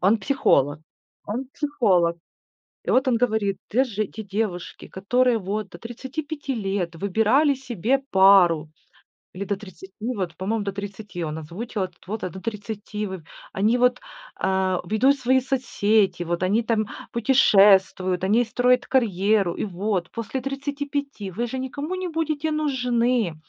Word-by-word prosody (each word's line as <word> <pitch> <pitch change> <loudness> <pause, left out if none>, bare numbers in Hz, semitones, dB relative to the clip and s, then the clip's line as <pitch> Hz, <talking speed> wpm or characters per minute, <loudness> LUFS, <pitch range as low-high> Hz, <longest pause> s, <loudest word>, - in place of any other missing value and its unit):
он 200 +5 +4
психолог 150 - +2 0.5
он 235 +6 -3
психолог. 195 - +2 0.7
И - - -2
вот 260 +2 +3
он 245 - +3
говорит: 220 -4 +1
"Те 255 +5 +3
же 215 -4 -2
те 220 - -8
девушки, 195 -3 -4
которые 245 +5 +1
вот 205 +1 -3
до - - -11
35 275 +4 -5
лет 195 -5 -2
выбирали 225 - +3
себе 255 -1 -1
пару 185 -5 +5 0.6
или 190 +2 -5
до 200 0 -2
30, 190 -1 -12
вот, 200 -8 -3
по-моему, 205 +3 -2
до 200 - -2
30 200 -2 -7
он 155 0 -4
озвучил, 190 +7 -4
этот 185 - -11
возраст 195 -5 -4
до 190 - -7
30, 210 0 -5
вы 190 -3 -6 0.3
они 215 +5 +2
вот, 250 0 +3 0.4
а, 190 -1 0
ведут 225 +9 +3
свои 260 +1 +3
соцсети, 220 -8 +1
вот 170 +1 -2
они 205 +5 +2
там 220 -2 0 0.2
путешествуют, 195 -6 +4
они 220 +6 +3
строят 250 +2 +2
карьеру, 205 -6 +2
и - - -3
вот 190 -2 -2
после 230 +3 -4
35 280 -4 -4
вы 230 +7 -2
же 260 +3 -5
никому 285 +6 -4
не 370 -1 -3
будете 315 -2 -1
нужны". 250 - +1
215 Hz, 145 wpm, -24 LUFS, 190-255 Hz, 0.7 s, пару